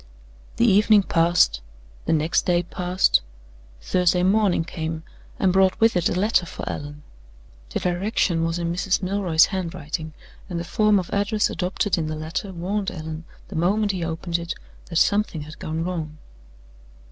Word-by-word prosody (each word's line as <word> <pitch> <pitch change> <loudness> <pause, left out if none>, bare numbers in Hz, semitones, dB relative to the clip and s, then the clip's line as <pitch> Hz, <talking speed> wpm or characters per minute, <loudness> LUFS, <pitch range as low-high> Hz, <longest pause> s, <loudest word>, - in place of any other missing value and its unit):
The 235 - +3
evening 210 -1 +5
passed; 170 - +3 0.4
the - - 0
next 160 +2 +1
day 175 -1 +3
passed; 180 +2 +1 0.6
Thursday 180 - +2
morning 195 -3 +3
came, 160 -1 -5 0.3
and 185 -2 +2
brought 190 0 +3
with 225 -1 +4
it 175 - +2
a 180 - -1
letter 200 -3 +2
for - - -7
Allan. 145 0 -6 0.7
The - - -3
direction 180 -2 0
was 165 +1 -1
in 170 -1 -2
Mrs. 190 +2 0
Milroy's 185 -4 +3
handwriting; 165 -4 -4 0.4
and 175 -2 -3
the - - -3
form 210 +4 +3
of 180 -3 -3
address 205 +1 +1
adopted 185 +1 -1
in 155 - -2
the 155 - -3
letter 160 +6 -4
warned 190 +3 -2
Allan, 160 0 -7 0.2
the 200 - -8
moment 200 +6 +2
he 185 -3 -3
opened 170 +1 -2
it, 170 0 -4 0.3
that 170 - -9
something 200 -2 +2
had 155 +1 -11
gone 160 +1 -3
wrong. 160 -4 -4
175 Hz, 160 wpm, -23 LUFS, 165-195 Hz, 0.7 s, evening